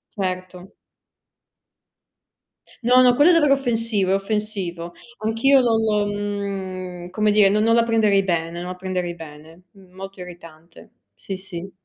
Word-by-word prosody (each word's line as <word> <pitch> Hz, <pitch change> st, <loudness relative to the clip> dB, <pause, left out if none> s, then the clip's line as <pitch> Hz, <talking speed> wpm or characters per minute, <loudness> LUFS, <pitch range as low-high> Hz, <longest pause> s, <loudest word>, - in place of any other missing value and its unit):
Certo. 185 Hz, -1 st, -5 dB, 2.1 s
No, 250 Hz, +2 st, +5 dB
no, 250 Hz, -1 st, +5 dB
quello 295 Hz, +7 st, +5 dB
è -, -, +4 dB
davvero 295 Hz, -4 st, +4 dB
offensivo, 230 Hz, -7 st, 0 dB
è -, -, +3 dB
offensivo. 195 Hz, -4 st, -3 dB, 0.3 s
Anch'io 225 Hz, +6 st, +3 dB
non, 220 Hz, -3 st, +1 dB
mhmm, 190 Hz, -3 st, -5 dB
come 210 Hz, +2 st, +1 dB
dire, 205 Hz, -1 st, +5 dB
non 210 Hz, +2 st, +1 dB
non 230 Hz, +1 st, +3 dB
la 235 Hz, -, +4 dB
prenderei 215 Hz, -4 st, +2 dB
bene 170 Hz, -2 st, -2 dB
non 180 Hz, -, -6 dB
la -, -, -7 dB
prenderei 180 Hz, -2 st, -4 dB
bene. 160 Hz, +2 st, -13 dB
Molto 195 Hz, 0 st, -12 dB
irritante. 170 Hz, -2 st, -13 dB, 0.2 s
Sì, 190 Hz, -, -7 dB
sì. 190 Hz, 0 st, -8 dB
195 Hz, 135 wpm, -21 LUFS, 180-220 Hz, 2.1 s, No